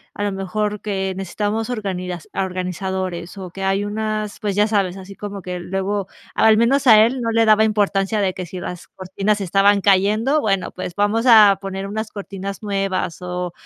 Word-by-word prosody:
a - - -5
lo 205 - 0
mejor 205 +2 -2
que 190 -2 -2
necesitamos 210 +5 -2
organidas 185 -6 -4
organizadores. 185 -1 -3
O 185 - -7
que 195 +1 -7
hay 195 +1 +1
unas, 215 0 -3
pues 205 -3 -2
ya 210 +1 +3
sabes, 195 -4 0
así 195 +1 -10
como 205 -1 -7
que 180 -1 -4
luego 195 +2 -2 0.3
al 220 0 +5
menos 265 +5 +2
a 215 -1 +8
él 250 +2 -2
no 230 -1 -1
le 225 0 +3
daba 215 0 +5
importancia 205 -1 +1
de 190 -2 0
que 185 - -5
si 180 +2 -7
las 180 0 -7
cortinas 195 +3 -2
se 195 - -3
estaban 200 +2 +3
cayendo. 210 +9 +3
Bueno, 195 -5 0
pues 180 -1 -6
vamos 205 +3 +1
a 210 -4 +8
poner 195 0 -5
unas 220 +1 -4
cortinas 200 0 -6
nuevas, 195 -4 -2
o 180 -1 -4
200 Hz, 190 wpm, -20 LUFS, 190-215 Hz, 0.3 s, a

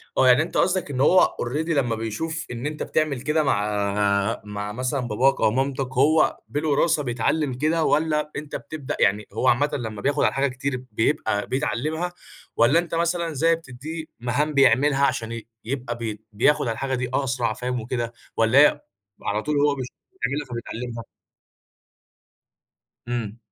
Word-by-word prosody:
آه 130 - +4
يعني 125 +5 +6
أنت 170 - -5
قصدك 185 -4 +1
إن 130 -2 -2
هو 180 +7 +5
already 150 +7 -2
لما 135 -7 +1
بيشوف، 155 +9 -4
إن 125 +2 -4
أنت 150 0 -3
بتعمل 150 -5 0
كده 150 +4 +1
مع 100 -2 +1
مع 105 0 -5
مثلًا 130 +4 -1
باباك 125 +3 +1
أو - - +4
مامتك، 135 +2 -1
هو 150 +5 +3
بالوراثة 150 +1 +1
بيتعلم 130 +3 0
كده 155 +5 +1
والّا، 150 -1 +1
أنت 145 0 -5
بتبدأ 150 -4 -6
يعني 105 +1 +2
هو 130 - +1
عامةً 145 +5 +3
لما 110 -5 -4
بياخد 145 +1 +1
على - - +5
الحاجة 135 +1 +1
كتير 130 0 -4
بيبقى 110 -3 0
بيتعلّمها، 150 +7 -2 0.4
والّا 130 +8 +5
أنت 170 -1 -2
مثلًا 170 0 0
زي 165 +4 +3
بتديه 155 +2 -7 0.2
مهام 145 +6 0
بيعملها 140 +2 +4
عشان 115 -3 -2
ي 115 -1 -7 0.2
يبقى 125 0 -3
بي 110 -3 -4
بياخد 145 +8 +3
على - - +1
الحاجة 135 +1 -2
دي 125 0 -2
أسرع 125 -4 0
فاهم 125 +2 -3
وكده، 120 0 -3 0.2
والّا 115 +4 +4
هي 150 0 +6 0.4
على 105 +1 -1
طول 150 -1 -1
هو 145 -1 +3
بيش 130 -2 -4 0.3
بتعملها 150 - -2
فبيتعلّمها؟ 120 0 -5 2.0
إمم. 115 -3 -3
135 Hz, 160 wpm, -24 LUFS, 115-150 Hz, 2.0 s, يعني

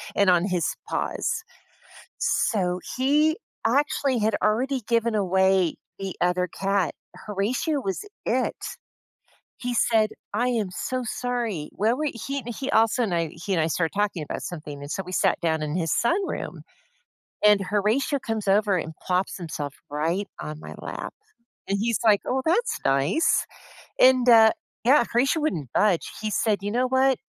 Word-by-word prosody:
and 200 -2 +4
on 175 +1 +3
his 180 -4 0 0.2
paws. - - -2 0.8
So, 180 -4 +1 0.2
he 300 +5 +3 0.3
actually 270 0 +1
had 215 0 +1
already 250 +4 +1
given 230 -1 +2
away 190 -3 +2 0.2
the 195 -2 -4
other 180 0 +1
cat, 195 0 0 0.2
Horatio 230 - -1
was 195 - -3 0.2
it. - - 0 1.0
He 245 -1 -3
said, 220 -2 +3 0.2
"I 240 +4 +1
am 220 -6 0
so 255 +6 -3
sorry. 235 -10 -2
Where 225 +4 +1
were" 305 +2 -1 0.2
he 275 0 -2
he 260 +4 -4
also 225 +2 +3
and 205 -6 -1
I 165 -1 +1
he 190 +4 -3
and 165 - +2
I 155 - +1
started 165 0 -1
talking 200 -6 0
about - - -5
something, 150 -4 -7
and 145 - -8
so 190 - -3
we 180 - -8
sat - - +2
down 160 -2 0
in 150 +1 -2
his 165 -5 0
sunroom, 370 +11 -1 0.8
and 210 -1 +6
Horatio 210 +9 +1
comes 220 -4 -3
over 200 -1 +3
and 160 -1 -5
plops 185 +1 0
himself 150 -5 -5 0.2
right 165 +7 -1
on 150 0 -6
my - - -9
lap, - - -6 0.5
and 200 - 0
he's 230 +1 +1
like, 210 -2 +5
"Oh, 265 +1 0
that's 465 +8 +1
nice." 140 - +2 0.6
And, 255 -1 +6
uh 225 -2 +8 0.3
Yeah, 255 +1 +5
Horatio 270 +7 +2
wouldn't 165 - -2
budge. 200 -5 +2
He 215 - -1
said, 210 -2 +1
"You 205 +1 -3
know 250 +2 +1
what? 260 0 +3
210 Hz, 160 wpm, -25 LUFS, 180-245 Hz, 1.0 s, uh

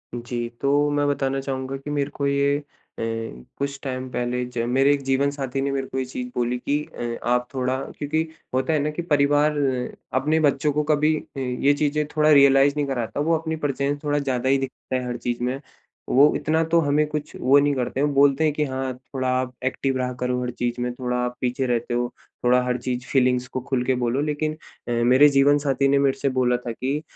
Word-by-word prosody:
जी, 120 0 -4
तो 145 +1 +3
मैं 145 0 +1
बताना 135 -1 0
चाहूँगा 135 0 -4
कि 135 +2 -9
मेरे 145 -1 -1
को 140 -1 -1
ये 140 0 +2
अ, 145 - -8 0.4
कुछ 115 - -5
टाइम 130 -1 -4
पहले 125 0 -1
ज 120 - -3
मेरे 135 +3 +4
एक 140 - -2
जीवन 135 +1 +1
साथी 135 -1 -3
ने 140 0 -1
मेरे 135 -1 -2
को - - -6
ये 130 - -1
चीज़ 125 0 -5
बोली 125 0 0
कि 145 +1 +2 0.2
अ 120 -1 -3
आप 125 0 +1
थोड़ा 130 0 0 0.2
क्योंकि 150 +2 0 0.3
होता 130 +4 +1
है 155 - +2
न - - -1
कि 150 - -4
परिवार 145 +1 +3 0.7
अपने 155 +3 +2
बच्चों 145 -1 +2
को 150 +1 +1
कभी 150 +1 +2
अ, 140 - -9
ये 130 +2 +1
चीज़ें 150 +1 0
थोड़ा 155 0 +4
रियलाइज 140 0 +6
नहीं 145 - +1
कराता। 125 -1 -3
वो 165 +3 +2
अपनी 160 0 -3
प्रेजेंस 140 +1 -1
थोड़ा 145 0 +1
ज़्यादा 130 -2 -1
ही 135 - +4
दिखता 135 -1 -5
है 125 -1 -1
हर 120 0 -3
चीज़ 120 0 -3
में। 130 +2 -1 0.5
वो 140 +3 +6
इतना 160 +1 +1
तो 165 +1 +2
हमें 150 +1 +2
कुछ 150 0 -5
वो 135 +3 +5
नहीं 145 0 +2
करते, 130 +1 -2
वो 145 - +3
बोलते 140 +2 +4
हैं 155 - +3
कि 150 - 0
हाँ 130 -1 -3 0.2
थोड़ा 130 -1 -1
आप 130 0 -3
एक्टिव 135 +1 -1
रहा 125 0 -2
करो 125 0 -1
हर 125 - -3
चीज़ 120 0 -3
में 125 - -1
थोड़ा 125 -1 -2
आप 125 0 -2
पीछे 125 +1 0
रहते 120 0 -1
हो, 120 0 0 0.4
थोड़ा 125 +1 +5
हर 125 0 0
चीज़ 125 0 -3
फीलिंग्स 125 -1 +2
को 130 - -4
खूल 130 -1 -1
के 130 - +2
बोलो 120 +4 +1
लेकिन 155 +1 -1 0.3
अ, - - -2
मेरे 125 +5 +5
जीवन 140 +1 +4
साथी 140 -1 +1
ने 140 0 +3
मेरे 135 -1 +2
से 140 - +1
बोला 125 -1 +2
था 120 -1 -6
कि 135 +6 -2
135 Hz, 225 wpm, -23 LUFS, 125-145 Hz, 0.7 s, रियलाइज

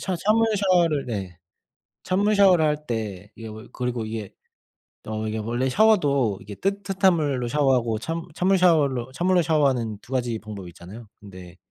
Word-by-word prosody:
샤 185 -2 -2
찬물 215 +5 +2
샤워를 175 -7 +2
네 95 -7 -5 0.6
찬물 205 +3 +1
샤워를 185 -5 +5
할 150 0 -2
때 105 -4 -5
이게 115 - -9
뭐 110 +2 -10
그리고 125 -3 -3
이게 110 -2 -6 0.7
어 110 0 -4
이게 110 +1 -3
원래 120 +4 -1
샤워도 140 - +2
이게 100 +2 -9
뜨뜻한 195 - +1
물로 140 -6 -1
샤워하고 125 -6 +1
찬 165 +7 -4
찬물 190 +4 +2
샤워로 140 -8 +2
찬물로 175 +6 +2
샤워하는 135 -9 +1
2 120 -1 -3
방법이 105 -4 -9
있잖아요. 95 +7 -12
근데 95 -3 -13
130 Hz, 325 characters per minute, -24 LUFS, 110-175 Hz, 0.7 s, 샤워를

